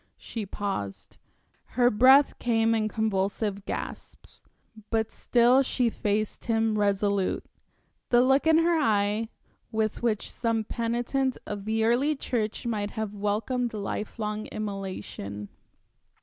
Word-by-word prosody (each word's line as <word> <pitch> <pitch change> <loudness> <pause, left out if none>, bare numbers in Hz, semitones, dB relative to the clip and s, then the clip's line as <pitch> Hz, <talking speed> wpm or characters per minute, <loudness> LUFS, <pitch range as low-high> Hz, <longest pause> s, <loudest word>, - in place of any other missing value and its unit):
She 220 -4 -6
paused, 195 - -5 0.6
her 245 0 +5
breath 260 +6 +6
came 225 -1 +2
in 220 -1 +1
convulsive 205 -1 -1
gasps, - - -7 0.5
but 220 -1 0
still 245 +2 +4
she 250 -3 +1
faced 210 0 -2
him 225 -2 +1
resolute, 200 -1 +1 0.6
the 240 0 +5
look 270 +4 +3
in 320 0 +6
her 330 0 +3
eyes 210 -4 +1 0.4
with 220 -1 -1
which 225 -3 0
some 230 -2 -1
penitent 240 +4 -1
of 205 -1 -5
the 220 0 0
early 255 +7 +2
church 225 -6 -2
might 210 -3 -1
have 215 -2 -2
welcomed 220 +4 -1
lifelong 210 +1 -4
immolation. 190 - -6
220 Hz, 120 wpm, -27 LUFS, 205-240 Hz, 0.6 s, breath